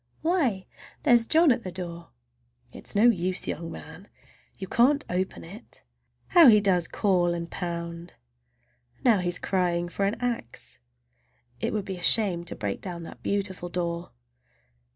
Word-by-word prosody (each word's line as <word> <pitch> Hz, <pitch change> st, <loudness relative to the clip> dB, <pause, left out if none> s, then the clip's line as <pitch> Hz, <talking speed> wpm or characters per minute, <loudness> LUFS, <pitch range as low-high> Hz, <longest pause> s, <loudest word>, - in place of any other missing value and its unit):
Why, 275 Hz, -, +1 dB, 0.4 s
there's 235 Hz, -2 st, +4 dB
John 325 Hz, -2 st, +5 dB
at 235 Hz, -1 st, 0 dB
the 185 Hz, -, -5 dB
door! 170 Hz, -1 st, -7 dB, 0.6 s
It -, -, -12 dB
is -, -, -7 dB
no 205 Hz, -, +4 dB
use, 185 Hz, -6 st, +2 dB
young 165 Hz, +1 st, -4 dB
man, -, -, -10 dB, 0.5 s
you 190 Hz, -, -6 dB
can't 280 Hz, +8 st, +3 dB
open 185 Hz, +1 st, -2 dB
it! 195 Hz, +8 st, -7 dB, 0.5 s
How 340 Hz, -5 st, +8 dB
he 215 Hz, -3 st, +8 dB
does 185 Hz, -5 st, +2 dB
call 175 Hz, -4 st, +1 dB
and 170 Hz, 0 st, -6 dB
pound! 170 Hz, -1 st, -5 dB, 0.9 s
Now 230 Hz, -5 st, +5 dB
he's 175 Hz, 0 st, -1 dB
crying 175 Hz, -2 st, 0 dB
for 195 Hz, +3 st, -1 dB
an 200 Hz, -, 0 dB
axe. 230 Hz, -, -5 dB, 0.8 s
It -, -, -1 dB
would 210 Hz, -2 st, -2 dB
be 190 Hz, -2 st, -5 dB
a -, -, -10 dB
shame 185 Hz, -3 st, +3 dB
to -, -, -5 dB
break 100 Hz, -3 st, -4 dB
down 175 Hz, -3 st, -5 dB
that -, -, -11 dB
beautiful 190 Hz, -3 st, -2 dB
door! 170 Hz, -1 st, -3 dB
185 Hz, 155 wpm, -26 LUFS, 170-220 Hz, 0.9 s, How